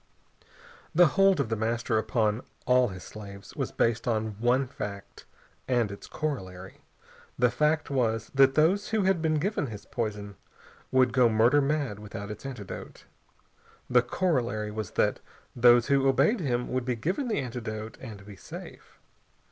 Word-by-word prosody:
The 175 -1 +7
hold 195 -1 +4
of - - 0
The 115 - 0
Master 115 +1 0
upon 110 0 0 0.2
all 125 0 +4
his 95 -3 -8
slaves 100 -2 -10
was - - -3
based 115 +1 0
on 110 -2 0
one 125 +3 +2
fact 105 -6 -8 0.4
and 120 -5 +1
its 100 - -9
corollary. 95 -12 -5 0.6
The 125 0 +3
fact 150 +4 +1
was, 115 -4 0
that 135 -1 +5
those 185 +7 +3
who 220 -2 +1
had 190 -3 +2
been 160 -1 +1
given 165 -1 -1
his 105 -3 -9
poison 105 -3 -4 0.5
would 130 -2 +3
go 125 -2 +5
murder 115 +6 +4
mad 140 -7 -1
without 105 0 -7
its 105 +6 -7
antidote. 120 -8 -8 0.9
The 125 0 +6
corollary 120 -7 -1
was 110 -2 -4
that - - +2 0.4
those 120 0 +6
who 135 -1 +3
obeyed 140 - +3
him 125 -6 -1
would 130 -1 -1
be 125 0 -1
given 180 - -2
that 220 - 0
antidote 115 -4 -5
and 105 -6 -9
be 105 -1 -11
safe. - - -11
120 Hz, 155 wpm, -28 LUFS, 110-140 Hz, 0.9 s, The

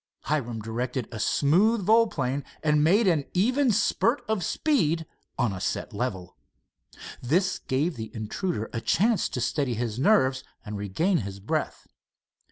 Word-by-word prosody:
Hiram 120 -7 -2
directed 120 +2 -3
a 110 - -6
smooth 190 - +3
volplane 145 - +2 0.2
and 150 -1 +3
made 200 +8 +4
an 160 -5 +3
even 255 +8 +2
spurt 225 +5 +1
of 215 -4 -1
speed 165 - +1 0.3
on 120 -6 +1
a 95 - -6
set - - -3
level. 100 -6 -4 0.9
This 180 +9 +1
gave 145 +4 -1
the 110 -1 -5
intruder 110 - -3
a 115 - -3
chance 215 - +2
to - - -4
steady 125 0 -1
his 115 0 -3
nerves 130 -7 +3 0.2
and 105 -1 -5
regain 105 - 0
his 100 -3 -6
breath. 100 - -3
145 Hz, 145 wpm, -26 LUFS, 115-190 Hz, 0.9 s, made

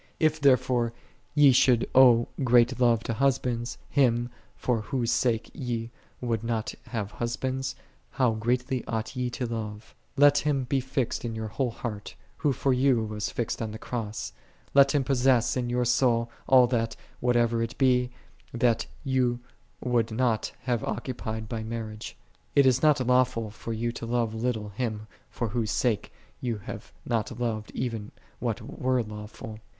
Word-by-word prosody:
If 155 -1 +2
therefore 125 -3 +3 0.4
ye 145 -2 +7
should 125 -1 +4
owe 120 -3 +7 0.2
great 125 0 +4
love 120 -2 +3
to 115 - -2
husbands, 125 -2 0
Him, 120 -3 +2 0.2
for 120 -3 0
Whose 120 +2 -1
sake 120 -2 +1
ye 120 -2 -3 0.3
would 115 -3 -1
not 115 -2 -2
have 110 -4 -3
husbands, 130 +3 -2 0.3
how 125 - +2
greatly 125 +3 -1
ought 110 -1 -3
ye 125 -1 -1
to 125 +1 -3
love? 110 -2 -5 0.2
Let 145 +1 +6
Him 145 -3 0
be 135 +2 0
fixed 130 -1 -2
in 115 -2 -3
your 110 -1 -4
whole 125 +4 -1
heart, 110 -3 -6 0.2
Who 145 - +1
for 135 +1 +1
you 125 -2 +3
was 105 -1 -3
fixed 120 -1 -3
on 110 - -2
the 110 - -6
Cross: 110 -3 -4 0.4
let 140 +1 +6
Him 140 - +3
possess 130 -2 +3
in 125 -2 -1
your 125 0 +1
soul 120 -1 +2 0.2
all 130 -2 +7
that, 115 -2 -1 0.2
whatever 120 -1 +2
it 115 +2 -3
be, 125 -2 +3 0.4
that 120 -1 +1 0.2
ye 130 -2 +1 0.5
would 120 -2 +2
not 115 -1 0
have 120 -2 0
occu 120 +4 -3
pied 110 -2 -5
by 110 0 -4
marriage. 110 -1 -6 0.4
It 140 - +6
is 130 -1 +4
not 150 -4 +4
lawful 125 -3 +2
for 115 +1 -7
you 115 +1 -1
to 115 0 -7
love 115 -2 0
little 110 -2 -2
Him, 110 0 -3 0.2
for 120 -3 -3
Whose 110 0 -1
sake 115 -6 0 0.3
ye 120 -3 -1
have - - -8
not 115 -3 0
oved 115 -3 -3
even 115 -4 -3 0.3
what - - -2
were 130 -1 0
lawful. 105 0 -8
120 Hz, 165 wpm, -27 LUFS, 115-130 Hz, 0.5 s, ye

